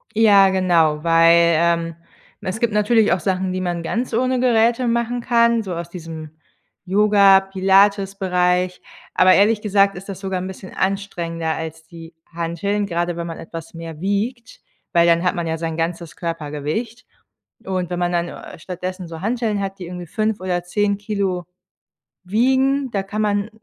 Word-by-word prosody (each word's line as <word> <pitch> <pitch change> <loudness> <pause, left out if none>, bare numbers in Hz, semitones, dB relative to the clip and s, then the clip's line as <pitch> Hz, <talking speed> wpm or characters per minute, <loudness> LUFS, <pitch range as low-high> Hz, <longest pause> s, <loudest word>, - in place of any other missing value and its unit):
Ja, 205 -3 +6
genau, 170 -5 +2
weil, 170 0 +5
ähm, 170 0 +1 0.5
es 185 +3 -4
gibt 235 -1 +1
natürlich 210 0 +3
auch 175 - +2
Sachen, 185 0 -1
die 185 0 -3
man 175 -2 -2
ganz 235 +8 -3
ohne 255 +2 +1
Geräte 240 0 +2
machen 235 +1 0
kann, 235 -1 +2
so 190 -3 -5
aus 170 0 -6
diesem 160 -3 -8 0.5
Yoga-Pilates-Bereich, 195 -2 +3 0.3
aber 185 0 +5
ehrlich 210 +2 +3
gesagt 200 -1 +2
ist 190 - -10
das 195 -2 -7
sogar 190 -2 -2
'n 185 - -5
bisschen 190 0 -10
anstrengender 170 -4 -2
als 160 0 -6
die 165 0 -13 0.2
Hanteln, 170 +5 -2
gerade 175 -2 -2
wenn 170 0 -4
man 165 - -6
etwas 165 0 -9
mehr 165 -2 -8
wiegt, 215 +6 -3 0.3
weil 170 0 +5
dann 170 0 +3
hat 180 - +1
man 170 -1 -3
ja 160 0 -2
sein 165 0 -4
ganzes 165 0 -3
Körpergewicht. 165 - -4 0.6
Und 185 -2 -2
wenn 175 - -3
man 175 0 0
dann, 175 0 0
äh, - - -10
stattdessen 185 +1 -6
so 165 -1 -8
Hanteln 220 -1 -1
hat, 195 0 -4
die 180 - -7
irgendwie 175 0 -7
5 215 +4 -2
oder 180 -1 -2
10 200 +3 0
Kilo 200 -4 -2 0.8
wiegen, 265 +7 +1
da 195 -3 -1
kann 205 +2 -4
man, 205 0 0
185 Hz, 165 wpm, -20 LUFS, 170-210 Hz, 0.8 s, Ja